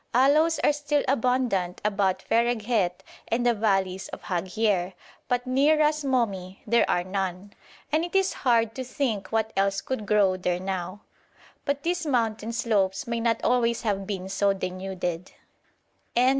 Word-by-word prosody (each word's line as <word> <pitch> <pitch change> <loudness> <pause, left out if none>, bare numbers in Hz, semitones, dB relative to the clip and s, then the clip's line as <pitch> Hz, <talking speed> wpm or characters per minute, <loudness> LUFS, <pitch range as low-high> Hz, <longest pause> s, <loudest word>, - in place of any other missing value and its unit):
Aloes 300 +6 +4
are 295 - +4
still 290 0 0
abundant 250 -8 +1
about 200 -3 +1
Fereghet 225 -5 +1 0.2
and 240 +2 0
the 240 - +4
valleys 195 -3 0
of - - -9
Haghier, 185 +1 0 0.3
but 245 0 0
near 275 +5 +3
Ras 305 0 +2
Momi 200 -9 -1
there 235 +2 +3
are 175 - +2
none, 190 +1 -4 0.4
and 310 +2 +2
it 350 +2 -5
is 385 -1 +3
hard 230 -3 +3
to 260 - -4
think 245 -6 -2
what 220 0 0
else 195 0 +1
could 215 -1 -4
grow 200 -3 +3
there 180 -1 -1
now; 185 +1 -4 0.6
but 280 0 -1
these 345 -1 -1
mountain 225 -4 0
slopes 200 -4 0
may 235 0 -2
not 230 -1 0
always 235 -1 +2
have 195 -3 -1
been 190 -2 -4
so 200 +1 +1
denuded. 185 -2 -4
220 Hz, 150 wpm, -26 LUFS, 190-250 Hz, 0.6 s, Aloes